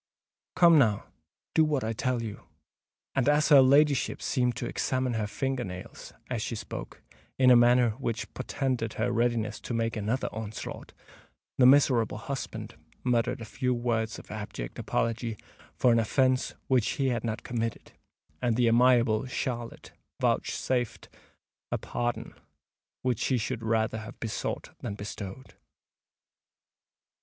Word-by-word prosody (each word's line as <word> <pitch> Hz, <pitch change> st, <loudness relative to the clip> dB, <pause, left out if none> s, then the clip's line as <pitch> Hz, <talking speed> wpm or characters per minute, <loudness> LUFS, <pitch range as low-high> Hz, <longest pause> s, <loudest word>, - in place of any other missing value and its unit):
Come, 170 Hz, -3 st, +7 dB
now—do 105 Hz, -, 0 dB
what 150 Hz, -4 st, 0 dB
I 110 Hz, +1 st, -1 dB
tell 125 Hz, +1 st, -1 dB
you." 105 Hz, -3 st, -7 dB, 0.7 s
And 135 Hz, 0 st, +2 dB
as 150 Hz, +2 st, +3 dB
her 145 Hz, -3 st, +9 dB
ladyship 140 Hz, +1 st, +4 dB
seemed 125 Hz, -3 st, 0 dB
to -, -, -4 dB
examine 130 Hz, -1 st, -1 dB
her 110 Hz, -2 st, -1 dB
finger 135 Hz, +3 st, -2 dB
nails, 90 Hz, -2 st, -8 dB, 0.2 s
as -, -, -2 dB
she -, -, -3 dB
spoke, -, -, -7 dB, 0.3 s
in 130 Hz, -1 st, +6 dB
a -, -, +9 dB
manner 120 Hz, 0 st, +5 dB
which 115 Hz, 0 st, -4 dB
portended 130 Hz, -3 st, -2 dB
her 120 Hz, +3 st, -1 dB
readiness 115 Hz, -2 st, 0 dB
to 120 Hz, -, -4 dB
make 115 Hz, 0 st, 0 dB
another 110 Hz, +4 st, -1 dB
onslaught, 110 Hz, 0 st, -7 dB, 0.7 s
the 125 Hz, -, +8 dB
miserable 130 Hz, -6 st, +4 dB
husband 135 Hz, +4 st, -5 dB, 0.3 s
muttered 125 Hz, 0 st, +1 dB
a -, -, -5 dB
few 125 Hz, +3 st, -1 dB
words 115 Hz, -2 st, -1 dB
of -, -, -12 dB
abject 105 Hz, -, -6 dB
apology 115 Hz, -1 st, -1 dB, 0.4 s
for 125 Hz, -, +4 dB
an 115 Hz, -, +4 dB
offence 130 Hz, +3 st, +1 dB
which 125 Hz, -4 st, +2 dB
he 135 Hz, -1 st, 0 dB
had 120 Hz, -3 st, -1 dB
not 110 Hz, -1 st, -3 dB
committed, 115 Hz, -2 st, -3 dB, 0.5 s
and 120 Hz, -2 st, +1 dB
the 120 Hz, 0 st, +3 dB
amiable 120 Hz, -1 st, +4 dB
Charlotte 120 Hz, -2 st, -4 dB, 0.3 s
vouchsafed 125 Hz, -3 st, -1 dB, 0.6 s
a -, -, +1 dB
pardon 120 Hz, 0 st, -3 dB, 0.7 s
which 125 Hz, -4 st, 0 dB
she 130 Hz, -, +1 dB
should 120 Hz, +1 st, -3 dB
rather 110 Hz, 0 st, 0 dB
have 110 Hz, +3 st, -10 dB
besought 115 Hz, -2 st, -4 dB
than 100 Hz, -, -5 dB
bestowed. 105 Hz, +4 st, -7 dB
120 Hz, 140 wpm, -28 LUFS, 110-130 Hz, 0.7 s, her